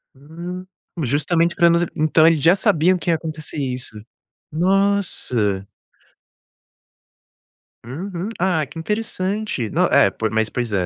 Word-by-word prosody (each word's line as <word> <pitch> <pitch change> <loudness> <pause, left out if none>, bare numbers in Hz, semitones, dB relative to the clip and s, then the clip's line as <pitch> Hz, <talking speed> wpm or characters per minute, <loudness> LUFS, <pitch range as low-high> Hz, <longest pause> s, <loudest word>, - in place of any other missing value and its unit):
Hum. 170 +6 -8 0.4
Justamente 165 +6 +1
para 170 - +5
nos 170 +1 +3
então 155 0 +4
eles 165 -2 +4
já 170 +5 +5
sabiam 180 0 +2
que 175 - -4
ia 165 - +4
acontecer 155 -1 -6
isso. 125 -5 -4 0.5
Nossa. 170 - 0 2.2
Uhum. 175 - -5
Ah, 180 -4 +1
que 155 +4 -10
interessante. 210 - -2
No - - +1
é, - - +5
po 110 -1 -3
mas 110 0 0
pois 120 -3 -3
é, 95 -3 0
165 Hz, 125 wpm, -20 LUFS, 130-180 Hz, 2.2 s, para